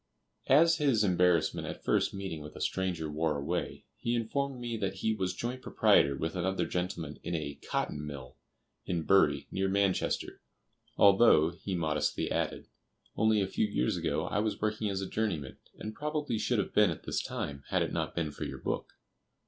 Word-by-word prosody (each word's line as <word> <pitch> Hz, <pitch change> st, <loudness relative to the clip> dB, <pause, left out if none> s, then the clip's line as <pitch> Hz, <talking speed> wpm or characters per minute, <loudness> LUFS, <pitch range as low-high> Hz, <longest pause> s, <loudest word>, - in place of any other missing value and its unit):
As 165 Hz, +4 st, +6 dB
his 135 Hz, -8 st, +3 dB
embarrassment 90 Hz, -4 st, +2 dB
at -, -, -7 dB
first -, -, +2 dB
meeting 95 Hz, -5 st, -5 dB
with 75 Hz, +1 st, -10 dB
a -, -, -8 dB
stranger 90 Hz, -4 st, -1 dB
wore 75 Hz, 0 st, 0 dB
away, 70 Hz, -, -3 dB
he 120 Hz, +1 st, 0 dB
informed 130 Hz, +3 st, -2 dB
me 120 Hz, -1 st, -3 dB
that 100 Hz, -2 st, -2 dB
he 110 Hz, +3 st, 0 dB
was 95 Hz, -4 st, -2 dB
joint 125 Hz, +2 st, -4 dB
proprietor 70 Hz, -, +3 dB
with 80 Hz, +4 st, -3 dB
another 95 Hz, +2 st, 0 dB
gentleman 90 Hz, -4 st, -3 dB
in 85 Hz, -, -3 dB
a 70 Hz, -3 st, -4 dB
"cotton 75 Hz, -, -1 dB
mill" 70 Hz, -4 st, -8 dB, 0.5 s
in 85 Hz, -3 st, -2 dB
Bury, 95 Hz, +4 st, +3 dB
near 95 Hz, 0 st, 0 dB
Manchester, 100 Hz, -1 st, 0 dB, 0.6 s
"although," 100 Hz, -6 st, +6 dB
he 90 Hz, +2 st, -5 dB
modestly 80 Hz, -3 st, -1 dB
added, -, -, -2 dB, 0.5 s
"only 110 Hz, -1 st, +3 dB
a -, -, -1 dB
few 105 Hz, -, 0 dB
years 65 Hz, -11 st, 0 dB
ago -, -, -1 dB
I -, -, -1 dB
was 110 Hz, 0 st, -1 dB
working 105 Hz, 0 st, -1 dB
as 95 Hz, -1 st, -2 dB
a 95 Hz, -, -3 dB
journeyman, 90 Hz, -13 st, -2 dB, 0.2 s
and 110 Hz, -, -6 dB
probably 150 Hz, -4 st, -2 dB
should 110 Hz, +3 st, +1 dB
have 100 Hz, -, -1 dB
been 105 Hz, -3 st, +5 dB
at 80 Hz, -, -5 dB
this -, -, -1 dB
time, 70 Hz, -1 st, -5 dB
had -, -, +2 dB
it -, -, -4 dB
not -, -, -2 dB
been 80 Hz, -3 st, -1 dB
for -, -, -6 dB
your -, -, -5 dB
book." -, -, -3 dB
95 Hz, 185 wpm, -31 LUFS, 80-110 Hz, 0.6 s, As